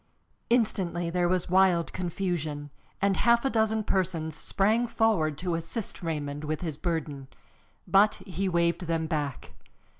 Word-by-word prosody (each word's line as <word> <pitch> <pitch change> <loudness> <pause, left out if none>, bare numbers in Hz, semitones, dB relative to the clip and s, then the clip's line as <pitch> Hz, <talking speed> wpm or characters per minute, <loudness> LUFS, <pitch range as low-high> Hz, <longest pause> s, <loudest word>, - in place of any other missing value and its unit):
Instantly 185 -8 +1
there 175 0 +1
was 180 -1 +1
wild 185 -2 +3
confusion, 165 -5 -3 0.3
and 200 -1 +3
half 235 +2 +3
a 270 - +2
dozen 220 -1 +1
persons 170 -6 -1
sprang 215 +8 +1
forward 195 -11 +1
to 180 -1 -2
assist 165 +6 -4
Raymond 150 -3 -3
with 155 0 -3
his 160 -5 -3
burden. 155 -4 -3 0.6
But 205 +2 +5
he 190 +1 -2
waved 170 0 +1
them 165 -1 0
back. 145 -4 -3
175 Hz, 140 wpm, -28 LUFS, 160-195 Hz, 0.6 s, But